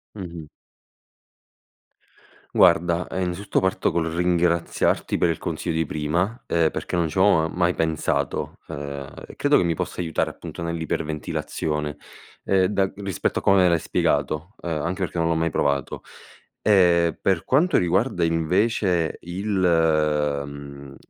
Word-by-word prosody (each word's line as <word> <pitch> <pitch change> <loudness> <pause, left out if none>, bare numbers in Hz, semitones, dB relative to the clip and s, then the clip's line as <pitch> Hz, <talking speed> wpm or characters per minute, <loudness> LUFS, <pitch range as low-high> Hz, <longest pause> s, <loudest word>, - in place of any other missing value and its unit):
Mh-mh. 85 -5 -7 2.1
Guarda, 85 0 +4
ehm, 95 - -3
innanzitutto 95 +3 -1
parto 95 +1 +1
col 85 -1 -1
ringraziarti 85 -1 +1
per 85 - +2
il 80 - -2
consiglio 85 +1 -3
di 80 -1 0
prima, 85 - -2
ehm, 85 -2 +2
perché - - -4
non 85 -2 +1
ci 75 - -9
avevo 90 -5 +4
mai 85 +1 +1
pensato. 80 -3 -1
Ehm, 70 -1 -6 0.2
e - - -13
credo 145 0 +3
che - - +4
mi 85 - +1
possa 90 - -4
aiutare 80 -2 -1
appunto, - - -9
nell'iperventilazione, 75 -2 -3 0.5
ehm, 95 -1 +3
da 95 -1 0
rispetto 100 -4 -2
a - - -5
come 95 -2 +5
l'hai 85 - +3
spiegato, 75 +4 -1
uhm, 85 - -6
anche 85 +4 -2
perché 90 -2 -3
non 85 -1 +1
l'ho 85 - +2
mai 80 +1 +1
provato. 70 -3 -1 0.6
E 85 -5 +4
per 95 -4 +1
quanto 155 - +2
riguarda 90 +2 +1
invece 85 +2 +1
il 90 +5 -5 1.0
mhmm, 70 -1 -10
85 Hz, 140 wpm, -23 LUFS, 80-95 Hz, 2.1 s, come